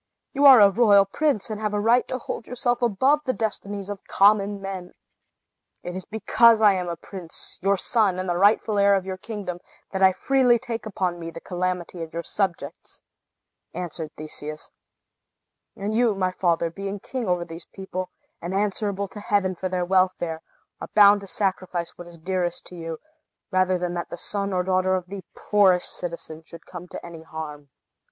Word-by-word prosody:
You 280 +1 +2
are 265 -4 +10
a 200 -1 +7
royal 205 -2 +5
prince, 225 0 0
and 215 0 -5
have 210 -1 -1
a - - +1
right 235 +4 +3
to 255 - -3
hold 230 - -6
yourself 245 0 -1
above 255 +6 +3
the 255 - +2
destinies 205 -3 -3
of 205 -1 -6
common 200 0 +3
men." 190 -2 -6 0.9
"It 175 - -6
is 185 - -6
because 225 +1 +4
I 210 -2 +6
am 180 -2 -2
a 170 - -3
prince, 170 0 -7
your 195 +1 +2
son, 205 -2 +1
and 185 0 -3
the 175 - 0
rightful 205 +2 +3
heir 200 0 +5
of 190 -1 -1
your 190 -1 -4
kingdom, 195 -4 -6 0.3
that 190 - -3
I 190 0 +7
freely 255 +3 +3
take 230 -1 -5
upon 185 -4 -2
me 165 0 -6
the 165 - -9
calamity 180 -1 -3
of 160 -1 -7
your 170 - -3
subjects," 190 -3 -4 0.7
answered 170 -3 -4
Theseus, 155 0 -6 1.0
"And 205 +1 -3
you, 230 -2 +2
my 185 -1 0
father, 170 -2 0
being 195 +3 -5
king 250 +2 -5
over 180 -1 0
these 165 0 -10
people, 185 -1 -6 0.3
and 175 +3 -4
answerable 200 0 -1
to 210 - -9
Heaven 200 -2 +1
for 185 +1 -4
their 180 -1 -1
welfare, 185 -3 +1 0.4
are - - -7
bound 205 -1 +7
to 200 - -10
sacrifice 185 -3 -2
what 175 - -10
is 170 -1 -13
dearest 175 +1 -2
to 180 - -11
you, 165 -1 -5 0.5
rather 185 -1 +2
than 175 0 -3
that 175 -1 -4
the - - -6
son 200 -1 -1
or 180 -1 0
daughter 185 0 +2
of 185 -1 -3
the 190 +1 -8
poorest 190 -4 +3
citizen 170 -2 -6
should 170 +1 -13
come 180 0 -9
to - - -9
any 170 -2 -9
harm." 150 -3 -8
190 Hz, 190 wpm, -24 LUFS, 175-205 Hz, 1.0 s, are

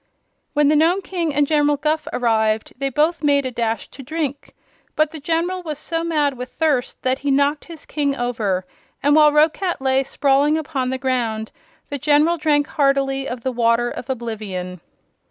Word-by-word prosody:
When 295 0 +3
the 305 - +4
Nome 340 +6 +3
King 345 -4 -2
and 290 0 +2
General 295 -1 +2
Guph 305 +1 -1
arrived 220 -2 0
they 275 0 0
both 310 +5 +1
made 285 -2 +2
a 255 - -2
dash 230 -1 -2
to - - -11
drink, 285 0 -4 0.4
but 310 -1 +2
the 320 - -8
General 335 +5 -1
was 310 -4 -5
so 330 +2 -3
mad 300 -4 +1
with 250 0 -7
thirst 290 -6 -1
that 260 +1 +1
he 285 - -2
knocked 285 +2 +2
his 330 -3 -11
King 285 -2 -1
over, 220 -7 -1 0.4
and 290 +1 +4
while 300 -1 +6
Roquat 315 +4 +2
lay 265 0 +2
sprawling 280 +3 +2
upon 275 -5 -2
the 260 - -2
ground 235 -5 -2 0.4
the 285 - -4
General 300 +4 +3
drank 295 -2 +2
heartily 275 -2 0
of 245 -1 -5
the 260 - -2
Water 235 0 +1
of 250 - -8
Oblivion. 210 -8 -5
280 Hz, 180 wpm, -21 LUFS, 250-305 Hz, 0.4 s, while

